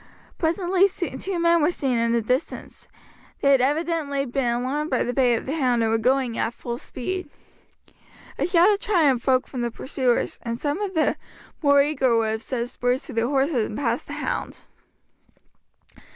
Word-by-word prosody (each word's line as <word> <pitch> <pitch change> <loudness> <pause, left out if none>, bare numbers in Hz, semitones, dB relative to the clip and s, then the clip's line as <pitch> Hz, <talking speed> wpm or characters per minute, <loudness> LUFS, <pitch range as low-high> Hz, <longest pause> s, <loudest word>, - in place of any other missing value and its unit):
Presently 360 +3 +2
two 350 +1 -4
men 335 0 +3
were 300 - +3
seen 265 -8 -1
in 230 0 +1
the 235 -1 +1
distance; 255 +7 -3 0.5
they 280 - +4
had 270 -2 +5
evidently 290 0 0
been 250 -1 -1
alarmed 275 +5 -2
by 255 - +1
the 245 - -2
bay 245 -2 +3
of - - -4
the 275 - -3
hound, 250 -6 +1
and 220 - +1
were 225 - +2
going 255 0 +1
at 235 - -1
full 240 0 -5
speed. 365 +5 -5 1.1
A - - +1
shout 355 +2 +5
of 400 - -2
triumph 305 - +2
broke 260 -1 +2
from 255 - -5
the 240 - 0
pursuers, 255 0 -1
and 230 0 -4
some 290 +8 -2
of 390 -3 -3
the 315 - +2 0.4
more 285 -2 +5
eager 265 -5 +1
would 220 -1 +1
have 220 0 -3
set 240 -1 -3
spurs 245 +1 -1
to - - -9
their 230 +1 +1
horses 270 -3 +1
and 215 - -6
passed 285 - -1
the - - -6
hound. - - -4
270 Hz, 185 wpm, -24 LUFS, 240-320 Hz, 1.1 s, had